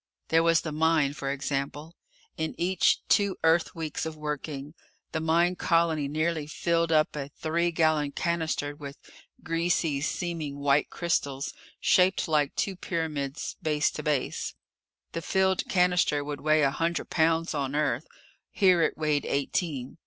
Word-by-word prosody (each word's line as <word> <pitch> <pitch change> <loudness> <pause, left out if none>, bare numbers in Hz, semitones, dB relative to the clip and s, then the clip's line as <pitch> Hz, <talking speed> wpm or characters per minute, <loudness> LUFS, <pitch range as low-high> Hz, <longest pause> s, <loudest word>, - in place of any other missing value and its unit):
There 165 0 +4
was 165 0 +4
the 155 - -5
mine, 155 -2 +2
for 140 -2 -4
example. 140 +3 -3 0.4
In 160 0 -3
each 185 +2 +2
two 200 -2 +2
Earth 165 +1 +3
weeks 160 -2 -4
of 160 -1 -5
working, 150 -1 -5 0.4
the 160 - -1
mine 170 +3 +2
colony 165 -4 +1
nearly 155 +1 -1
filled 165 +2 0
up 155 -1 +3
a 140 -1 -4
three 170 +4 -1
gallon 155 -3 +2
cannister 160 -3 -1
with 140 -1 -9 0.5
greasy 165 -3 0
seeming 160 -2 -3
white 140 0 +2
crystals 140 -5 -2 0.3
shaped 185 +1 +3
like 150 -3 +1
two 195 - -1
pyramids 155 -5 -3
base 150 -3 +1
to - - -6
base. 150 -4 -1 0.6
The 165 - -4
filled 190 +1 +1
cannister 180 -5 +2
would 145 0 -5
weigh 155 0 +3
a 135 - +3
hundred 165 +3 -2
pounds 165 0 +2
on 140 -2 -2
Earth. 150 -1 0 0.4
Here 185 -3 +4
it - - +1
weighed 150 -2 0
eighteen. 140 -1 -2
155 Hz, 145 wpm, -27 LUFS, 145-170 Hz, 0.6 s, There